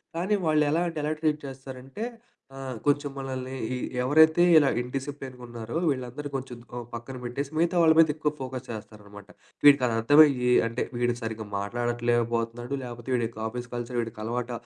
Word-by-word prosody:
కానీ 185 +5 +1
వాళ్ళెలా 155 +1 +3
అంటే, 165 - -5
ఎలా 150 - 0
ట్రీట్ 155 -1 +1
చేస్తారంటే, 135 - -8 0.5
ఆహ్, 135 -2 -5
కొంచెం 145 0 +2
మనల్ని 130 -1 -5 0.2
ఈ - - -1 0.3
ఎవరైతే 160 +5 +5
ఇలా 145 -3 +5
ఇన్‌డిసిప్లీన్‌గున్నారో 125 -2 -6
వీళ్ళందరూ 130 +1 -3
కొంచెం 130 -2 -5 0.2
ఓ - - -3 0.2
పక్కన 120 +3 -7
పెట్టేసి, 135 +4 -4
మిగతా 170 +2 +2
వాళ్ళ 160 -1 +7
మీదెక్కువ 155 -1 +3
ఫోకస్ 130 -1 -5
చేస్తారనమాట. 105 -2 -10 0.4
వీడికదర్థమయ్యి 130 0 +6 0.2
అంటే 115 +2 -2 0.2
వీడు 120 0 +1
సరిగ్గా 110 -1 -4
మాట్లాడట్లేకబోతనాడు. 120 +2 -1
లేపోతే, 120 0 -8
వీడికి 115 -2 -2
ఆఫీస్ 120 +1 -6
కల్చర్ 120 0 -3
వీడికలవాట 115 +2 -4
125 Hz, 135 wpm, -27 LUFS, 120-145 Hz, 0.5 s, వాళ్ళ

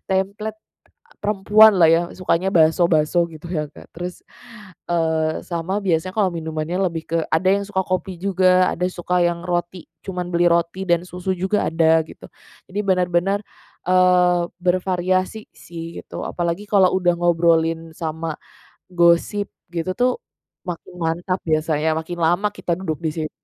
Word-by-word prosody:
template, 200 +3 -1 0.7
perempuan 210 +1 +5
lah 165 - +7
ya 165 +1 +5 0.2
sukanya 185 +1 0
bakso-bakso 165 0 +3
gitu 155 +2 -10
ya 165 -3 -2
Kak. - - -14
Terus, 175 +1 -6 0.7
eee, 160 -2 0
sama 170 +2 -4
biasanya 180 0 0
kalau 200 -4 +2
minumannya 160 +1 -3
lebih 165 -1 -5
ke 165 - +1
ada 175 +4 +1
yang 200 +1 +1
suka 190 -2 0
kopi 185 0 -3
juga, 185 -1 +3
ada 180 - -1
suka 180 0 -1
yang 175 0 0
roti, 175 0 -3 0.2
cuman 180 -1 -4
beli 175 0 +3
roti 170 +3 0
dan 170 0 +2
susu 180 +1 -4
juga 190 +3 0
ada 160 0 +3
gitu. - - -13 0.4
Jadi 205 - -3
benar-benar, 185 0 +1 0.4
eee, 180 -1 +4 0.2
bervariasi 185 +2 0
sih 165 -1 -9
gitu, - - -8
apalagi 170 +3 -2
kalau 195 -3 +3
udah 180 -1 +3
ngobrolin 165 -1 +2
sama 160 -1 -5 0.5
gosip 175 +4 +2 0.2
gitu 170 +2 -2
tuh 250 +1 +3 0.6
makin 175 0 -6
mantap 175 +3 -1
biasanya, 155 0 +1
makin 175 +2 -5
lama 175 +6 +2
kita 180 -3 -2
duduk 160 -5 -3
di - - +2
sit 155 -2 -3
175 Hz, 145 wpm, -21 LUFS, 165-185 Hz, 0.7 s, lah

